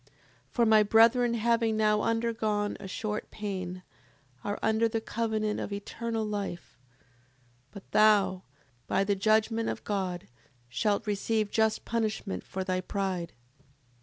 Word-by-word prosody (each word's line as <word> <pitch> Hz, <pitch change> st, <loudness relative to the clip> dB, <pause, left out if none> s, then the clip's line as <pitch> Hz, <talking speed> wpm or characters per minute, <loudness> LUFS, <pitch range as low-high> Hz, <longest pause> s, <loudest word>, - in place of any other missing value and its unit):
7:36. -, -, -29 dB, 0.4 s
For 235 Hz, -, +2 dB
my 220 Hz, -1 st, +6 dB
brethren 230 Hz, +3 st, +5 dB
having 230 Hz, -1 st, +1 dB
now 210 Hz, -1 st, +3 dB
undergone 220 Hz, -2 st, 0 dB
a 195 Hz, -, -7 dB
short 210 Hz, +2 st, -4 dB
pain, 185 Hz, -3 st, -5 dB, 0.6 s
are 205 Hz, -, -2 dB
under 220 Hz, +1 st, +2 dB
the 225 Hz, 0 st, -1 dB
covenant 220 Hz, -1 st, -1 dB
of -, -, -4 dB
eternal 225 Hz, +2 st, -3 dB
life: 200 Hz, -4 st, -5 dB, 0.9 s
but 200 Hz, -, -13 dB
thou, 205 Hz, -3 st, +4 dB, 0.5 s
by -, -, +2 dB
the 200 Hz, +1 st, +1 dB
judgment 220 Hz, +3 st, +2 dB
of -, -, -4 dB
God, 185 Hz, -4 st, -3 dB, 0.4 s
shalt 200 Hz, -, 0 dB
receive 210 Hz, +1 st, 0 dB
just 220 Hz, -1 st, +1 dB
punishment 220 Hz, -3 st, -2 dB
for 190 Hz, -, -4 dB
thy 185 Hz, -1 st, -1 dB
pride. 185 Hz, -4 st, -3 dB
215 Hz, 135 wpm, -29 LUFS, 200-225 Hz, 0.9 s, my